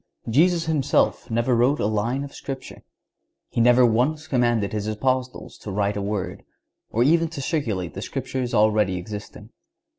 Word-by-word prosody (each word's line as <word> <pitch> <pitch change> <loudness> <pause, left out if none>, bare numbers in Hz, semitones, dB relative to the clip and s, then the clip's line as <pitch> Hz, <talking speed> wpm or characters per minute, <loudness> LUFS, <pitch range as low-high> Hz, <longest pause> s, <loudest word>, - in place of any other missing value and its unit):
Jesus 165 +8 +3
Himself 150 -4 +1
never 120 +2 +1
wrote 125 +5 +3
a - - 0
line 110 +6 0
of 140 - -9
Scripture. 135 -1 -7 0.7
He - - 0
never 125 +1 +6
once 130 +7 +1
commanded 120 -7 +1
His 105 -1 -2
Apostles 130 +3 -2
to - - -8
write 100 +1 0
a 100 - -2
word,(139) 100 -1 -3 0.5
or 115 +2 +2
even 165 +4 +3
to 160 -3 -8
circulate 115 - -2
the 95 - -6
Scriptures 130 0 -3
already 105 -3 +3
existing. 105 +3 -8
120 Hz, 155 wpm, -24 LUFS, 105-135 Hz, 0.7 s, never